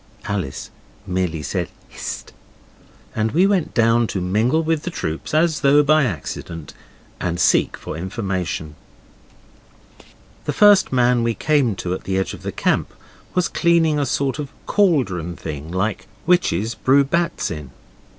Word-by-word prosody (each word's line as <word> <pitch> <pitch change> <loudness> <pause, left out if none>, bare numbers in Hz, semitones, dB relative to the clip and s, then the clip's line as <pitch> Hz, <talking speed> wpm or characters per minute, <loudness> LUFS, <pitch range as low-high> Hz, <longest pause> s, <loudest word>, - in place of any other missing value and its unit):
Alice 95 -10 -4 0.3
merely 90 -5 -2
said - - -2 0.2
'Hist', - - -7 0.8
and 110 0 0
we 175 +5 +4
went 195 -4 +1
down 115 0 +3
to 95 - -3
mingle 110 - +1
with 160 -1 0
the 180 - -4
troops 80 - -4
as 160 0 +2
though 145 +1 +5
by 155 0 +4
accident, 85 - -5 0.5
and 85 -1 -2
seek - - +3
for - - -7
information. 90 -4 -3 1.7
The - - -1
first 205 -2 +6
man 125 -1 +3
we 115 -1 0
came 140 -8 +2
to 90 -1 -3
at - - -6
the 95 -1 -1
edge 95 - -1
of - - -9
the - - -4
camp - - 0 0.4
was 180 -1 +2
cleaning 165 -3 +2
a 140 - 0
sort 135 +2 -1
of 145 -2 -4 0.2
cauldron 110 - +1
thing 75 -1 -6
like 95 +4 -2 0.2
witches 115 - +2
brew 135 +4 +3
bats 170 - -1
in. 75 -5 -6
115 Hz, 150 wpm, -21 LUFS, 90-155 Hz, 1.7 s, first